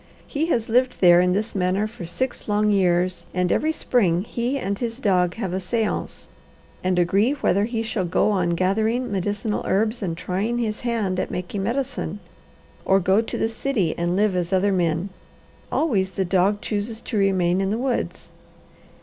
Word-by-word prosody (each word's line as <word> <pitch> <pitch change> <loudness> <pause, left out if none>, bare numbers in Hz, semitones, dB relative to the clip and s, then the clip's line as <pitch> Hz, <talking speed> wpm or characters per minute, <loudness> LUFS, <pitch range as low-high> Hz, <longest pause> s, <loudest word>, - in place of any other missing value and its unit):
He 310 +2 -2
has 230 -9 0
lived 250 +3 +2
there 175 -1 +7
in 180 0 +2
this 210 +4 -2
manner 190 +1 +1
for 215 -6 -7
six 260 +9 -3
long 210 0 +2
years, 180 -2 +1
and 180 -1 +1
every 315 - +2
spring 190 - +1
he 240 +4 -2
and 200 -6 -3
his 235 -2 -3
dog 180 -7 +1
have 195 -6 -3
a 190 - 0
seance 215 +3 -2 0.6
and 185 0 +1
agree 195 +9 +3
whether 205 -8 +1
he 225 -1 -2
shall 220 -4 -2
go 180 +4 +2
on 180 -4 +1
gathering 220 +7 0
medicinal 205 +2 -2
herbs 220 +4 +1
and 170 -4 -3
trying 200 +7 -2
his 220 -3 -2
hand 220 -6 -1
at - - -2
making 180 +3 -4
medicine 250 -2 -2 0.6
or 195 0 +4
go 190 +3 +3
to 225 - -5
the - - +1
city 225 -6 -1
and 175 +1 -1
live 205 -1 +2
as 175 0 -1
other 195 +1 +2
men. 175 0 0 0.6
Always 205 -12 +1
the 190 +1 -2
dog 195 +3 +2
chooses 215 +1 -3
to 235 - -5
remain 190 -2 +2
in 195 - 0
the 215 - 0
woods. 250 0 -2
200 Hz, 180 wpm, -23 LUFS, 185-230 Hz, 0.6 s, there